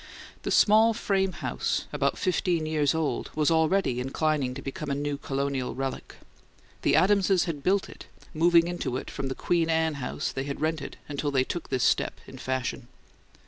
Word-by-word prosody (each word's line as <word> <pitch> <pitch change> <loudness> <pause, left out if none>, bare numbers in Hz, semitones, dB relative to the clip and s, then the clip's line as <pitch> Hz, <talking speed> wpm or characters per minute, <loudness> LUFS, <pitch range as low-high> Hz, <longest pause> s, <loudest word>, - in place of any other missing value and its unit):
The - - -4
small 220 +2 +5
frame 195 -3 +1
house, - - -2
about - - 0
fifteen 180 -4 0
years 155 -2 +1
old, 160 -3 -1
was 155 +1 +2
already 160 -4 +2
inclining 135 0 0
to 135 - -6
become 140 +2 -5
a 140 - 0
new 145 0 -2
Colonial 140 -3 -2
relic. 135 0 -4 0.7
The - - +3
Adamses 195 -2 +4
had 155 -4 -4
built 190 +5 +1
it, - - -12 0.3
moving 170 +1 +4
into 175 -8 -2
it - - -7
from 135 - -4
the 130 - -3
"Queen 170 -2 +1
Anne" 160 -1 +2
house 125 - -3
they 135 - -4
had 140 -1 -4
rented 155 -2 -2
until 145 0 -2
they 135 -2 +2
took 170 +5 -5
this 130 -2 0
step - - +1
in - - -11
fashion. 130 -1 -3
155 Hz, 180 wpm, -27 LUFS, 135-175 Hz, 0.7 s, small